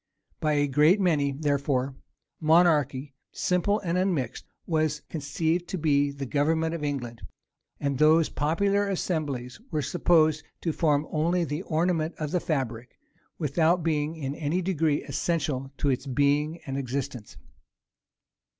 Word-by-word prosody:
By 155 -1 +1
a 145 0 +3
great 150 +8 +4
many, 155 -7 +2
therefore, 140 -2 0 0.5
monarchy, 155 -4 +3 0.2
simple 185 +4 +1
and 180 -1 0
unmixed, 170 -11 -1 0.2
was 155 -2 0
conceived 160 +3 -1
to 190 - -3
be 145 -3 +2
the 140 -1 -5
government 160 +4 +1
of 165 -3 -4
England; 120 -6 -4 0.6
and 140 -1 -1
those 155 +1 +5
popular 200 +7 +1
assemblies 150 - -3
were 155 -3 -1
supposed 160 0 +3 0.2
to 165 - -1
form 150 -3 +2
only 170 +3 +1
the 150 +1 -3
ornament 165 -1 0
of 150 -2 -3
the 180 - +1
fabric, 125 -8 -3 0.4
without 165 +3 +2
being 155 -1 0
in 140 -4 -4
any 160 +5 -1
degree 160 -5 +1
essential 140 -6 -2
to 145 - 0
its 130 +2 -3
being 145 +4 +1
and 135 0 -3
existence. 130 -3 -5
155 Hz, 135 wpm, -27 LUFS, 140-165 Hz, 0.6 s, those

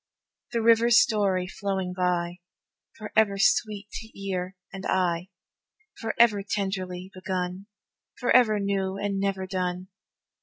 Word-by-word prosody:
The 230 -2 0
river's 230 +1 +5
story 205 -8 +2
flowing 190 -1 -3
by, 180 -1 -1 0.6
Forever 215 -1 +1
sweet 215 0 +2
to 220 -2 -9
ear 185 -1 -3 0.2
and 190 0 -7
eye, 180 -1 0 0.7
Forever 225 -2 +3
tenderly 190 -2 -3
begun 185 0 -4 0.5
Forever 240 -4 +4
new 195 -1 -1
and 200 -1 -2
never 195 -1 -1
done. 185 -1 -3
195 Hz, 110 wpm, -26 LUFS, 185-210 Hz, 0.7 s, river's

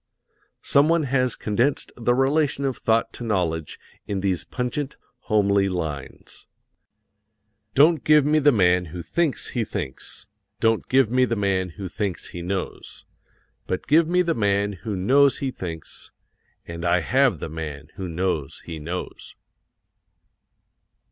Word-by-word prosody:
Someone 155 +3 +3
has 130 -2 +1
condensed 120 +7 0
the 120 0 +1
relation 140 +1 +1
of 135 -2 0
thought 115 0 +1
to - - -7
knowledge 85 -8 -1 0.3
in 100 -2 -2
these 95 -4 0
pungent, 130 +3 -3 0.3
homely 100 -2 +3
lines: 80 -7 -6 1.3
"Don't 155 +2 +5
give 150 -2 +5
me 155 +1 +3
the 145 0 +5
man 90 -5 +3
who 85 +1 -7
thinks 165 - 0
he 120 - -1
thinks, 90 -11 -6 0.3
Don't 115 -1 +1
give 130 -4 +3
me 130 +1 +4
the 120 - -1
man 95 -3 0
who 100 -2 -5
thinks 95 -1 -3
he 85 - -7
knows, 95 +2 -5 0.6
But 95 - -3
give 155 +2 +4
me 180 +1 +3
the 170 -1 +1
man 100 -3 +1
who 105 +2 -5
knows 135 +9 +4
he 135 -2 -2
thinks, 85 - -7 0.6
And 85 0 -7
I 85 +1 +3
have 130 0 +2
the - - -5
man 75 -2 -7
who 95 -3 -6
knows 85 -4 -2
he 80 -2 -6
knows!" 85 +4 -6
105 Hz, 140 wpm, -24 LUFS, 90-135 Hz, 1.3 s, Don't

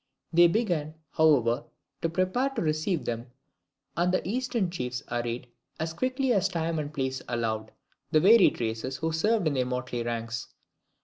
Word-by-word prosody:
They 175 +1 +7
began, 170 -7 0 0.2
however, 135 -7 +3 0.4
to 165 - +1
prepare 185 +10 +1
to 270 - -4
receive 155 +2 0
them 115 +1 -3 0.7
and 175 +2 +2
the 185 - 0
Eastern 235 -4 -1
chiefs 125 -7 -4
arrayed, 120 +1 -2 0.3
as 160 +1 -2
quickly 255 +5 0
as 195 -2 +3
time 165 -3 -1
and 145 -1 -4
place 130 -3 -2
allowed, 110 -2 -2 0.4
the 155 0 +4
varied 200 +4 +6
races 115 +3 -2
who 160 +1 -1
served 210 +5 +1
in 155 - +2
their 130 -2 0
motley 125 -1 -3
ranks. 115 0 -3
155 Hz, 160 wpm, -28 LUFS, 125-185 Hz, 0.7 s, They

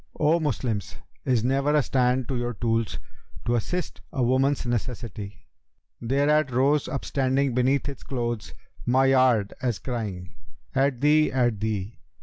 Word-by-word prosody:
O 155 +2 +3
Moslems, 120 - -2 0.3
is 125 -4 +2
never 140 +4 +2
a 150 - +4
stand 125 -1 +1
to 135 - -2
your 120 -1 -2
tools, 115 +1 -1 0.2
* - - -20
To 120 - +1
assist 175 +10 -2
a 130 - 0
woman's 130 +3 +2
necessity?' 120 -3 -4 0.6
Thereat 140 +4 +2
rose 135 +4 +2
upstanding 135 -1 0
beneath 130 +3 +2
its 140 - -6
clothes 120 -4 -4 0.2
* - - -18
My 135 - +5
yard, 130 -6 +3
as 120 -5 0
crying, 100 -7 -5 0.4
'At 135 -2 +1
thee! 150 +1 +4
at 120 -5 +1
thee!' 105 -1 -3
125 Hz, 145 wpm, -25 LUFS, 115-140 Hz, 0.6 s, My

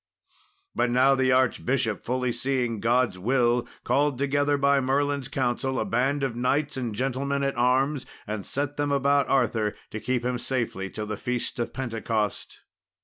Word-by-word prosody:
But 125 - +1
now 130 +3 +4
the 130 -1 +2
archbishop, 125 -3 +1
fully 125 0 -1
seeing 120 -2 -1
God's 120 -3 +1
will, 120 +2 +2 0.2
called 145 -1 +1
together, 145 +1 +1
by 140 0 +3
Merlin's 140 0 0
counsel, 130 0 -1
a - - 0
band 135 +5 0
of 125 -4 -1
knights 140 +4 0
and 120 -5 -3
gentlemen 135 +3 -1
at 135 0 0
arms, 130 +3 +1 0.2
and 105 -1 -4
set 145 +5 -3
them 145 -1 0
about 140 0 +2
Arthur 115 -5 +1 0.2
to 110 - -4
keep 125 +1 -1
him 125 -1 -1
safely 115 -7 -2
till 105 +2 -5
the 105 0 -4
feast 125 +1 -3
of 120 - -2
Pentecost. 115 -4 -3
130 Hz, 160 wpm, -26 LUFS, 120-140 Hz, 0.2 s, now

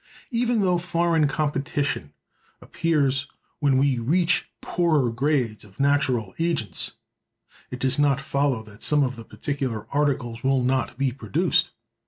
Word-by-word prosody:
Even 235 -1 +1
though 180 -2 +2
foreign 170 -3 +1
competition 145 - -2 0.5
appears 140 -5 0 0.3
when 140 -3 +3
we 135 -2 +2
reach 170 +8 +2
poorer 155 -8 +1
grades 125 -3 0
of 100 -2 -18
natural 135 -7 +1
agents, 155 - 0 0.8
it 125 - -5
does 130 +2 0
not 140 -2 +3
follow 140 -4 0
that 110 0 -15
some 150 -1 +4
of 130 -1 -1
the 115 - -9
particular 130 -4 -4
articles 130 -5 0
will 135 -1 +2
not 130 0 0
be 135 -1 +1
produced. 110 -6 +1
140 Hz, 135 wpm, -24 LUFS, 125-150 Hz, 0.8 s, some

